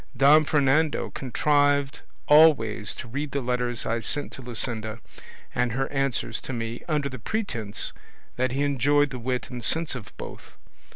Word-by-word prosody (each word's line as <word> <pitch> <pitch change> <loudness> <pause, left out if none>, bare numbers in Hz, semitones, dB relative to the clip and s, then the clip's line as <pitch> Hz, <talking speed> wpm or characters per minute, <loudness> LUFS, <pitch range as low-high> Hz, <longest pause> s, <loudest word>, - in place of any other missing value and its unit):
Don 150 +4 +6
Fernando 145 +1 +2
contrived 145 +2 +1 0.3
always 140 -9 +5
to - - -7
read 140 +5 -4
the 140 - 0
letters 125 -1 -1
I 115 +1 0
sent 145 +5 -1
to - - -9
Luscinda 115 -2 -3 0.5
and 125 -2 0
her 135 +2 -1
answers 135 -3 -1
to 130 - -6
me, 115 0 -4
under 150 -4 0
the 130 -2 -7
pretence 115 - -3 0.4
that 130 0 0
he 135 +3 0
enjoyed 145 +1 +2
the 125 - -5
wit 125 +2 -3
and 120 -1 -6
sense 160 +5 +1
of 120 -8 -8
both. - - -9
130 Hz, 160 wpm, -26 LUFS, 120-145 Hz, 0.5 s, Don